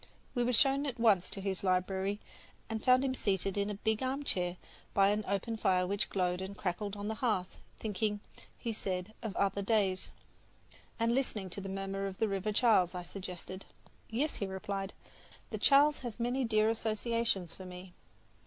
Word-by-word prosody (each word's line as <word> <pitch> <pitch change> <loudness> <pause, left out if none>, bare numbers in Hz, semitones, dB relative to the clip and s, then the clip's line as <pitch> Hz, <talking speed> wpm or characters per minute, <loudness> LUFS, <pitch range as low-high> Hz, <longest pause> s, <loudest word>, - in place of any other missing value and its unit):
We 245 - +1
were 245 - +2
shown 275 +4 +4
at 245 -3 -4
once 200 -6 +4
to - - -3
his 190 -1 -2
library 190 +2 +1 0.5
where 225 - -2
we - - -17
found 255 +1 +5
him 260 - +1
seated 195 -5 0
in 200 0 0
a 205 - -2
big 220 +2 0
armchair 255 -10 -1 0.4
by 195 0 +6
an 210 +1 +1
open 200 +4 -1
fire 185 -3 +3
which 200 +2 0
glowed 180 -1 0
and 190 +1 -6
crackled 200 +2 -2
on 205 0 -4
the 220 - 0
hearth, 200 -7 0 0.2
thinking, 210 0 -1 0.4
he 230 -2 -3
said, 190 0 -3
of 220 -5 -4
other 200 0 +1
days. 195 -3 +1 0.9
"And 230 +1 +3
listening 215 -8 -1
to 200 - -4
the 195 - -5
murmur 195 0 -2
of 190 -1 -6
the 220 - +2
River 195 +1 -1
Charles," 205 -6 +4
I 180 - -3
suggested. 185 0 -7 0.5
"Yes," 270 +8 0
he 200 - -2
replied, 195 +1 -4 0.6
"the - - -3
Charles 290 +1 +6
has 240 -2 -6
many 245 +2 +1
dear 215 -1 +3
associations 225 -4 0
for 190 - -10
me." 180 0 -9
200 Hz, 180 wpm, -33 LUFS, 190-230 Hz, 0.9 s, by